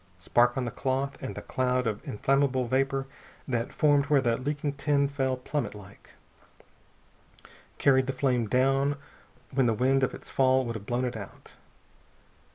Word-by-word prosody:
Spark 120 +8 +2
on 130 - -1
the 120 - -3
cloth, 135 +1 -2
and 130 - -5
the - - -7
cloud 125 0 0
of 105 -2 -2
inflammable 135 +3 +1
vapor 135 +2 0 0.4
that 120 -3 -2
formed 145 -2 +3
where 145 -1 +4
the 120 -3 +1
leaking 145 +3 -2
tin 140 0 +1
fell 135 -2 -1
plummetlike, 105 -7 -6 1.6
carried 130 -1 +3
the 135 - -1
flame 125 -5 +1
down 135 +4 +2 0.5
when 130 -2 +2
the 115 - +2
wind 135 +4 +2
of 130 - 0
its - - -13
fall 130 -1 +2
would 115 - -3
have 105 -2 -8
blown 125 +1 0
it 125 -1 -3
out. 100 -3 -10
130 Hz, 160 wpm, -28 LUFS, 120-135 Hz, 1.6 s, where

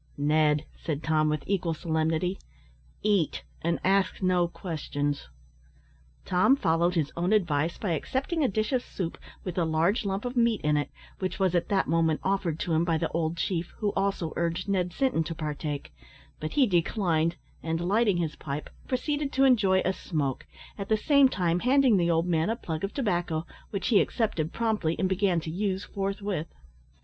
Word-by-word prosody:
"Ned," 150 +1 +2 0.2
said 155 -2 -2
Tom, 155 -1 +2
with 150 -1 -1
equal 180 -4 0
solemnity, 160 +3 0 0.6
"eat, 200 -7 +1 0.2
and 170 +1 0
ask 190 -1 +2
no 180 -2 +2
questions." 145 - -3 1.0
Tom 185 +9 +4
followed 170 -5 +1
his 155 -4 0
own 175 +3 0
advice 170 -6 +1
by 200 - -2
accepting 265 - -1
a - - +4
dish 215 +4 -1
of 255 - +2
soup, 180 -8 -5 0.2
with 180 -1 -3
a - - +3
large 165 +8 +1
lump 195 +2 -2
of 245 +1 -3
meat 235 -3 +3
in 150 0 +2
it, 145 -1 0 0.3
which 185 -1 -2
was 190 -2 +2
at 175 -1 0
that 195 -2 +2
moment 160 -1 +2
offered 190 -5 0
to 170 - -1
him 160 +1 +3
by 165 -2 +1
the - - -1
old 165 0 -1
chief 170 0 -2
who 205 -2 -1
also 195 -5 -1
urged 170 +2 -1
Ned 185 -3 0
Sinton 255 -7 +1
to 165 +1 -4
partake; 150 -2 -4 0.5
but 155 - -4
he 280 - +5
declined, 170 -4 +1 0.3
and, 165 0 -2
lighting 200 +2 +2
his 165 -3 -2
pipe, 145 0 -5 0.2
proceeded 290 +2 -1
to 270 - +3
enjoy 205 -8 +4
a 185 - +2
smoke, 145 -8 -3 0.3
at 195 - -5
the 220 - +4
same 280 +3 +5
time 175 -6 0
handing 255 -1 +4
the 170 -1 +2
old 165 0 +2
man 165 +1 +1
a 225 - +1
plug 160 -8 -5
of 195 - -1
tobacco, 175 - -1 0.2
which 200 +1 -2
he 215 -5 +6
accepted 175 -9 -1
promptly, 215 -8 0
and 190 - +1
began 190 -2 +2
to 160 - -5
use 190 +2 -1
forthwith. 195 -4 -3
175 Hz, 180 wpm, -28 LUFS, 160-205 Hz, 1.0 s, he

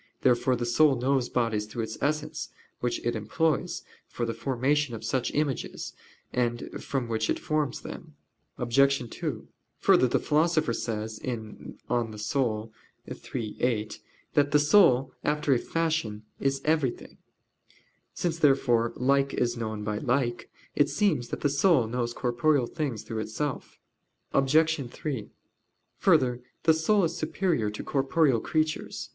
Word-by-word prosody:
Therefore 125 0 +3
the 120 0 -2
soul 135 +4 +4
knows 130 0 +1
bodies 115 -4 0
through 115 +1 -4
its 110 0 -5
essence, 150 +1 -2 0.3
which 120 - -1
it 120 - 0
employs 155 +9 -1 0.2
for 120 - -3
the 115 - -2
formation 130 +3 0
of 110 - -8
such 130 -2 -1
images, 145 -3 -2 0.4
and 120 -1 -1
from 135 -5 -2
which 110 -1 -1
it - - +1
forms 150 -3 -1
them. 155 -3 -9 0.4
Obj. 135 +1 +2
2: - - -4 0.3
Further, 130 - +4
the - - +2
Philosopher 155 -3 +2
says 110 -1 -3
(De - - -4 0.6
Anima 115 -3 -1
iii, 110 -1 -4
8) 110 -4 0 0.3
that 145 -1 +3
"the 150 - +4
soul, 145 -5 +5
after 150 -1 +2
a 125 - +2
fashion, 160 -12 -1 0.2
is 135 0 0
everything." 155 -5 -1 1.0
Since, 165 -2 -2
therefore, 120 -6 +3
like 140 +2 +2
is 120 -1 0
known 110 -2 -4
by 105 0 -2
like, 125 -2 -1 0.3
it 145 - +3
seems 160 - +1
that - - -5
the - - +3
soul 140 -1 +3
knows 120 +1 -2
corporeal 125 +2 +2
things 130 -6 -3
through 110 - -4
itself. 125 +6 -4 0.5
Obj. 145 0 +3
3: 130 -9 -4 0.7
Further, 125 -1 +3 0.2
the 160 - +6
soul 190 +6 +2
is 165 0 0
superior 155 - 0
to 105 - -6
corporeal 135 -2 +2
creatures. 155 +5 -2
130 Hz, 140 wpm, -28 LUFS, 115-150 Hz, 1.0 s, the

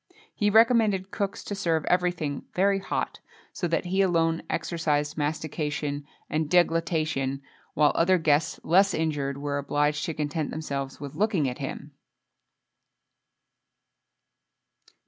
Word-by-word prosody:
He 205 - +1
recommended 220 -3 +4
cooks 200 -1 -3
to - - -5
serve 165 -5 0
everything 175 -6 0
very 195 +1 +3
hot, 195 - -3 0.3
so 175 - -2
that 165 +2 0
he 190 +2 +1
alone 165 -3 +2
exercised 160 -3 -1
mastication 150 -1 -3 0.2
and 155 -1 -1
deglutition, 160 -6 +1 0.3
while 150 0 +4
other 185 +2 +3
guests 155 -2 +1
less 195 +3 +4
inured, 145 -4 -1
were 145 0 -2
obliged 150 +1 0
to 165 - -3
content 150 0 -2
themselves 140 -3 -4
with 140 -2 -7
looking 195 -8 +1
at 125 - -4
him. - - -6
160 Hz, 120 wpm, -26 LUFS, 145-180 Hz, 0.3 s, recommended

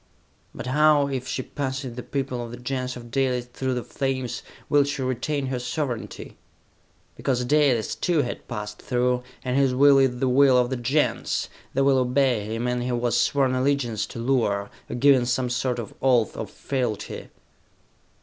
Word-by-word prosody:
"But - - -6
how, 145 +1 +4
if 130 -2 -3
she 130 - -2
passes 130 -2 -4
the 125 - -5
people 130 -2 -3
of 120 - -7
the 120 - -8
Gens 125 +1 -3
of 120 -1 -11
Dalis 125 -2 0
through 130 +1 -3
the 125 - -2
flames, 130 -3 -3 0.3
will 145 -1 +4
she 145 -1 -3
retain 130 +3 -1
her 130 -1 -2
sovereignty?" 125 -1 -4 0.8
"Because 125 -2 -1
Dalis, 135 -5 +2
too, 165 -5 +1
has 120 - -3
passed 105 -2 -6
through, 125 0 +1 0.2
and 125 0 0
his 135 -2 +3
will 140 +1 +6
is 130 -2 +2
the 130 - 0
will 130 0 +5
of 125 0 +2
the - - 0
Gens! 130 +5 0 0.3
They 135 - +3
will 135 -1 +4
obey 125 -3 +2
him, 115 +3 -3
and 125 0 0
he 120 - -2
has 120 -2 0
sworn 135 -2 +2
allegiance 130 -5 0
to - - -9
Luar, 115 -5 0 0.2
or - - -4
given 130 -1 +4
some 125 0 0
sort 125 0 0
of 115 -4 -6
oath 125 -5 +3
of - - -5
fealty!" 125 -6 -3
125 Hz, 180 wpm, -25 LUFS, 120-135 Hz, 0.8 s, will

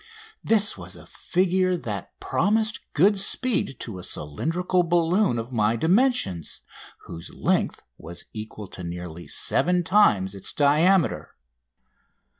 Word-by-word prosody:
This 215 -2 +2
was - - -8
a - - -13
figure 185 0 0
that 105 - -7
promised 215 +4 0
good 195 +6 +4
speed 205 - -1
to 105 -6 -5
a - - -9
cylindrical 165 - -1
balloon 175 - +2
of 115 +3 -5
my 110 -1 +1
dimensions, 165 - +1 0.4
whose 85 -1 -9
length - - 0 0.2
was 85 +2 -9
equal 110 -1 -7
to 90 - -9
nearly 85 0 -7
seven 180 0 +2
times 105 - +3
its 100 - -5
diameter. 155 +5 +2
160 Hz, 120 wpm, -24 LUFS, -, 0.4 s, good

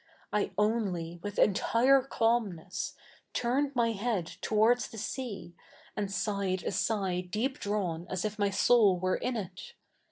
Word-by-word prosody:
I 210 -1 +1
only, 195 -6 0
with 205 +1 -5
enti7'e 250 +7 +4
cabnness, 200 -6 0 0.4
turned 270 +4 0
7?iy 230 -3 +1
head 210 -5 0 0.2
towards 225 +3 +3
the 225 - -11
sea, 210 -6 -5 0.4
a7id 205 -2 -2
sighed 190 -1 -1
a - - -1
sigh 195 -5 0
deep 215 +9 -2
drawn 180 -5 -2
as 185 0 -2
if 215 0 -3
my 200 -1 +3
soul 200 -1 +4
were 185 +1 0
i7i 240 -5 -1
it. 180 +1 -12
210 Hz, 140 wpm, -30 LUFS, 185-230 Hz, 0.4 s, enti7'e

